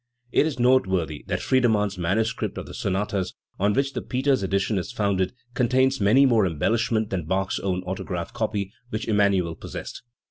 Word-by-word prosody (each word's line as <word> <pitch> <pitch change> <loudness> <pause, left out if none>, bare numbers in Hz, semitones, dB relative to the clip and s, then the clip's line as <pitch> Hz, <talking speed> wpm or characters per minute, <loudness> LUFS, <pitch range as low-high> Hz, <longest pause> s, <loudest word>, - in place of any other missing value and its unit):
It 150 - +3
is 145 -4 -4
noteworthy 95 - +2
that - - -2
Friedernann's 110 -6 +2
manuscript 110 +7 -1
of - - -5
the - - -10
sonatas, 95 -1 -2 0.2
on 100 +2 +2
which 135 +2 0
the - - -3
Peters 130 0 +1
edition 100 +1 0
is 85 - -5
founded, 95 -3 0 0.2
contains 130 +1 +2
many 115 +8 +5
more 115 -7 +4
embellishments 110 +6 0
than 90 -5 -2
Bach's 95 +2 0
own 90 -2 -2
autograph 90 +1 -4
copy, 105 -4 -2 0.2
which 110 0 -4
Emmanuel 100 -5 +2
possessed. - - -8
105 Hz, 165 wpm, -25 LUFS, 95-120 Hz, 0.2 s, many